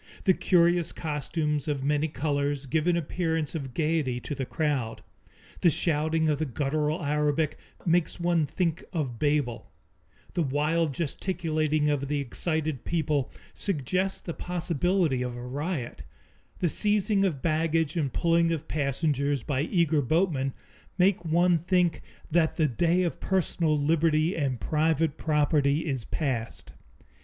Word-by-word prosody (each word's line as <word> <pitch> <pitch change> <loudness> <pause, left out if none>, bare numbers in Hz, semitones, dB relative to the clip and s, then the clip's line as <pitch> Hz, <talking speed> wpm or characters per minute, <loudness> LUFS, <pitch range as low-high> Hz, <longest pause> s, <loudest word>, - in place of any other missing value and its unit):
The 190 - +5
curious 175 -2 +3
costumes 150 -1 -2
of 145 -3 -1
many 150 +2 +1
colors 145 -1 -1
give 155 +4 0
an 175 -1 +3
appearance 160 -1 -1
of 135 -6 -5
gayety 150 -6 0
to 145 - -5
the 135 -2 -4
crowd; 145 -8 -2 0.6
the 175 - +5
shouting 160 0 +1
of 150 -2 +1
the 155 - 0
guttural 150 +4 -1
Arabic 150 +1 0 0.3
makes 175 0 +1
one 170 -3 +2
think 170 0 -1
of 135 -9 -3
Babel; 145 -6 0 0.6
the 175 - 0
wild 155 +3 +1
gesticulating 155 -2 -1
of 140 -1 -1
the 145 +1 -1
excited 155 +1 -2
people 155 -5 0 0.2
suggests 185 +2 -1
the 170 - -5
possibility 175 -4 0
of 125 -1 -3
a 120 - -7
riot; 140 0 -4 0.6
the 175 - +1
seizing 205 +1 +3
of 160 -9 -1
baggage 160 -1 +1
and 145 -6 0
pulling 170 +4 +2
of 160 -3 -3
passengers 140 -2 0
by 140 -3 -1
eager 160 -2 +2
boatmen 140 -2 +1 0.4
make 185 -1 +3
one 170 +1 +3
think 175 -2 +1 0.3
that 160 -1 +2
the 155 - +2
day 170 +8 +2
of 170 - -2
personal 170 -4 +1
liberty 155 +2 +2
and 135 -6 -1
private 160 -1 +1
property 150 -1 +2
is 135 -7 -2
passed. 125 -7 -3
155 Hz, 140 wpm, -27 LUFS, 145-170 Hz, 0.6 s, The